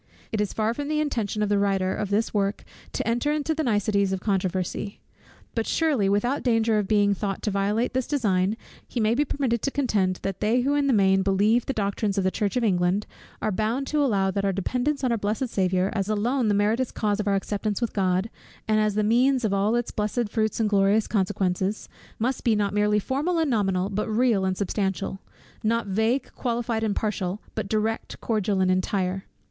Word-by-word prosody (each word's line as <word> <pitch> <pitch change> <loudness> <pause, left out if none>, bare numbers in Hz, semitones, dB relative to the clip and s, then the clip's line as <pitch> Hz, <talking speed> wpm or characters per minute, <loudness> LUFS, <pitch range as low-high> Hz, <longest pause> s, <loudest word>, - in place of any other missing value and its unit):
It 215 - 0
is 210 - -1
far 220 +1 0
from 285 +3 -4
the 305 0 0
intention 225 -8 -1
of 210 - 0
the 205 -1 +2
writer 195 -2 +1
of 205 - -3
this 210 +3 0
work 200 0 0 0.3
to - - -2
enter 240 +5 +1
into 305 +1 0
the 315 - -2
niceties 205 -5 +1
of 190 - -1
controversy. 190 0 -2 0.5
But 225 -1 -1
surely 285 -12 +2
without 240 +8 +1
danger 225 -3 +2
of 205 - -2
being 205 -1 +3
thought 195 -1 -3
to 210 - 0
violate 205 +5 0
this 260 -1 -1
design, 210 -7 +1 0.3
he 245 - -4
may 220 0 +3
be 280 +5 +2
permitted 265 -5 -1
to - - 0
contend, 210 -10 +1
that 195 -1 -3
they 225 +4 +2
who 275 +3 +1
in 290 -1 +2
the - - +3
main 195 -4 +4
believe 205 +5 +2
the - - +1
doctrines 200 -2 -1
of 195 - +2
the 185 - +1
church 205 +4 -1
of 245 - +1
England, 185 0 +1 0.4
are 215 - +1
bound 220 +7 -1
to 300 -1 +2
allow 195 -7 +2
that 195 +1 -2
our 200 - +2
dependence 250 +9 -1
on 255 - +2
our 230 - 0
blessed 215 +5 -1
Saviour, 185 -2 +1
as 200 -1 -2
alone 230 +4 +1
the 205 - +2
meritorious 220 +5 +1
cause 210 -1 -1
of 210 - -2
our 200 - +3
acceptance 205 +1 -2
with 235 -3 -2
God, 190 +1 0 0.4
and 215 0 +3
as 215 -1 +1
the 215 - +2
means 250 +3 +3
of 205 - 0
all 200 +3 +2
its 240 -1 -1
blessed 215 +2 -1
fruits 220 0 -1
and 220 - +2
glorious 205 +1 +3
consequences, 190 0 -1 0.3
must 250 +3 -1
be 230 -2 +3
not 200 -1 0
merely 210 0 +2
formal 285 - -1
and 320 -4 +1
nominal, 195 -4 +1
but 210 +2 -2
real 220 -3 +2
and 185 -1 -1
substantial: 195 -1 -2 0.4
not 230 +2 +1
vague, 220 +7 0
qualified, 235 -2 -2
and 215 -2 0
partial, 200 -2 -2
but 195 - -4
direct, 220 +1 -2
cordial, 205 -3 0
and 185 0 +3
entire. 185 0 -1
210 Hz, 210 wpm, -25 LUFS, 195-235 Hz, 0.5 s, main